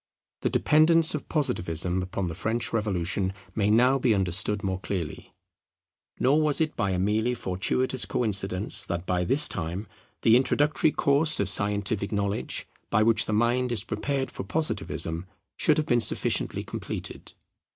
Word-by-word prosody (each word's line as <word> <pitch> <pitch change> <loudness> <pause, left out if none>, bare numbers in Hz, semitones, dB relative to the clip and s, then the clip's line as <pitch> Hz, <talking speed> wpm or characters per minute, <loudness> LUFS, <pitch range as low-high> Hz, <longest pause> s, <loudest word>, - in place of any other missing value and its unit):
The - - 0
dependence 160 +1 +4
of 150 - -5
Positivism 90 - -1
upon 90 +1 -4
the 85 - -4
French 110 +8 -2
Revolution 95 -3 -1 0.2
may 105 -1 0
now 125 +5 +4
be 120 -4 +2
understood 95 +2 +1
more 95 -1 -2
clearly. 90 -5 -5 0.9
Nor 140 +5 +3
was 150 -2 +2
it 160 -1 -1
by 100 - -1
a 95 - -1
merely 110 +6 0
fortuitous 120 +6 -1
coincidence 100 -3 -1
that 85 +1 -4
by 90 -1 0
this 135 +9 +5
time 90 +5 -4 0.4
the 115 - +6
introductory 145 +4 +2
course 150 +3 +3
of 100 -1 +2
scientific 100 +1 0
knowledge 100 -1 -2 0.2
by 110 - +3
which 115 0 +2
the 110 - -1
mind 120 +3 +1
is 110 -4 0
prepared 135 +3 -3
for - - -6
Positivism 90 - -3 0.3
should - - +2
have 155 - 0
been 120 -5 +2
sufficiently 110 - +1
completed. - - -7
105 Hz, 150 wpm, -26 LUFS, 95-130 Hz, 0.9 s, the